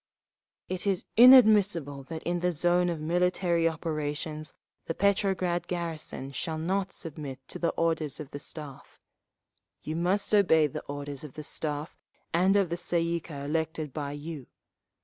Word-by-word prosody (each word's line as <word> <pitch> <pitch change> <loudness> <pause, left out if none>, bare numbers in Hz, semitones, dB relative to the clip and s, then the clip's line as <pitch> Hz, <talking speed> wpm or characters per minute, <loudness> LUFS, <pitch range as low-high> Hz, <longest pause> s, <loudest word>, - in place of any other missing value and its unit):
"It 185 +2 -4
is 195 -3 0
inadmissible 210 - +6
that 160 +2 -7
in 175 +1 -1
the 180 +1 +1
zone 175 +2 +2
of 170 -2 -3
military 170 +1 +1
operations 155 -1 -4 0.3
the 165 - -3
Petrograd 190 -3 +1
garrison 165 -6 -4
shall 160 +4 -3
not 185 +4 -1
submit 140 -5 -7
to - - -5
the 170 - +1
orders 160 -4 -1
of 150 -2 -8
the 145 - -6
Staff…. 145 -2 -9 0.8
You 155 - -4
must 185 +6 +1
obey 170 -7 +5
the 145 - -4
orders 145 0 -6
of 150 -4 -9
the 155 - -7
Staff 150 +1 -3 0.4
and 185 +4 +4
of 195 -4 +3
the 170 - -2
Tsay 170 -1 +1
ee 170 0 0
kah 145 -4 -8
elected 160 -1 -2
by 145 -2 -4
you. 145 -2 -7
165 Hz, 155 wpm, -28 LUFS, 150-180 Hz, 0.8 s, inadmissible